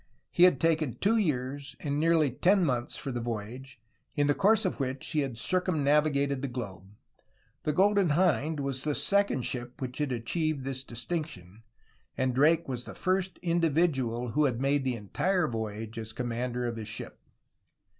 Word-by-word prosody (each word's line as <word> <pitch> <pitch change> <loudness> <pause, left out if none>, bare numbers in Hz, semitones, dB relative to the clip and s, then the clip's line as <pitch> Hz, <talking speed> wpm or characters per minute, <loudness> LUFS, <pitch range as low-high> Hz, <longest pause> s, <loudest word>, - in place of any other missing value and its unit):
He 175 - +6
had 180 -8 +4
taken 160 -5 +1
two 220 +3 +2
years 140 - -2
and 145 -1 -2
nearly 160 -3 +3
ten 185 - +3
months 125 -4 -1
for 135 - -4
the 120 -1 -3
voyage, 120 +3 -6 0.4
in 145 - +2
the 145 - +3
course 215 +4 +3
of 185 - -1
which 130 0 -3
he 155 - 0
had 135 -5 -2
circumnavigated 145 -4 +2
the 140 - -2
globe. 105 -6 -7 0.7
The 150 - +1
Golden 200 +1 +3
Hind 155 -1 +2
was 135 -1 -2
the 150 -1 0
second 200 -2 +1
ship 120 +1 -4
which 130 -1 -5
had 145 -3 0
achieved 140 +5 -1
this 135 0 -3
distinction, 115 - -5 0.6
and 130 -1 +1
Drake 155 +6 +3
was 125 -2 -4
the - - -9
first 185 0 -1
individual 155 -8 +1
who 150 +6 +2
had 125 -4 0
made 135 +1 +1
the 130 -2 0
entire 175 - 0
voyage 110 -1 -4
as 110 0 -7
commander 125 +1 -2
of 120 -1 -3
his 110 -2 -6
ship. 110 0 -7
140 Hz, 170 wpm, -29 LUFS, 120-160 Hz, 0.7 s, He